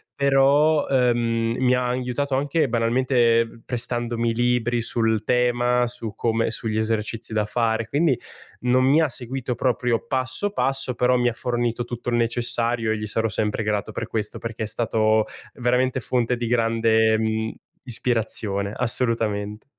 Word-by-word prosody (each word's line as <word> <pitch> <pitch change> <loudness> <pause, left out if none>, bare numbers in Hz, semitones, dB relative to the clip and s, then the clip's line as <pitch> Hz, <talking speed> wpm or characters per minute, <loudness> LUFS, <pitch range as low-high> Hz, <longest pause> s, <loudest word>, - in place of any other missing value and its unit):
però, 140 +2 +3
uhm, 120 -3 +1
mi 125 -1 +3
ha 125 0 +1
aiutato 130 +2 -1
anche 145 +1 +1
banalmente 115 -1 +2
prestandomi 120 -1 -1
libri 120 0 +1
sul 110 -2 0
tema, 125 0 +2
su 115 -3 -6
come 115 -1 0
sugli 110 -1 -2
esercizi 110 0 -2
da 105 -1 +1
fare, 115 0 0
quindi 145 0 +2 0.4
non 125 +1 +3
mi 145 +4 +4
ha 160 - +3
seguito 125 0 -4
proprio 125 -1 0
passo 130 +9 -1
passo 135 -2 0
però 125 +1 +3
mi 120 0 +2
ha 120 - -4
fornito 120 0 -2
tutto 120 0 -5
il 120 - 0
necessario 115 -1 0
e 110 - 0
gli 105 - -4
sarò 115 +2 0
sempre 110 0 -1
grato 105 -1 -2
per - - -4
questo, 105 -1 -2
perché 115 -1 -5
è - - -1
stato 110 -1 +1 0.3
veramente 125 +1 +1
fonte 125 0 0
di 120 - -3
grande, 115 -1 +2
mhmm, 110 0 -1 0.3
ispirazione, 110 -4 -1
assolutamente. 110 -4 -1
120 Hz, 150 wpm, -23 LUFS, 115-125 Hz, 0.4 s, mi